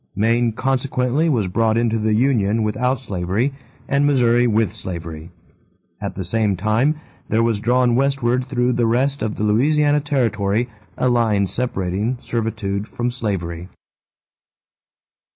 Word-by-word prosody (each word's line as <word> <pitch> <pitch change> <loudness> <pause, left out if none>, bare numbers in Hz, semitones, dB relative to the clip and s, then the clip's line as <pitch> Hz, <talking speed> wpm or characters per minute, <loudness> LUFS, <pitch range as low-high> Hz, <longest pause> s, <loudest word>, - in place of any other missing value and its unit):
Maine 115 +2 +2
consequently 130 +4 0
was 120 -9 +1
brought 110 +4 +1
into 115 -1 +1
the 110 0 +1
union 110 -3 +2
without 125 +5 0
slavery 105 +3 -1 0.3
and 140 +1 +2
Missouri 125 -4 +3
with 110 -4 +1
slavery. 85 -3 -6 0.7
At - - -4
the - - -4
same 110 -4 +1
time 110 - +1 0.3
there 115 +1 +2
was 115 -3 +1
drawn 125 +2 +2
westward 130 -1 +1
through 125 -1 0
the 120 -1 +1
rest 135 +4 +1
of 110 -1 -2
the - - -3
Louisiana 145 +7 +3
territory 120 -6 0 0.3
a - - +1
line 115 -5 +2
separating 105 +1 -2
servitude 110 -4 -3
from 120 0 -2
slavery. 90 -7 -4
115 Hz, 135 wpm, -20 LUFS, 105-125 Hz, 0.7 s, Missouri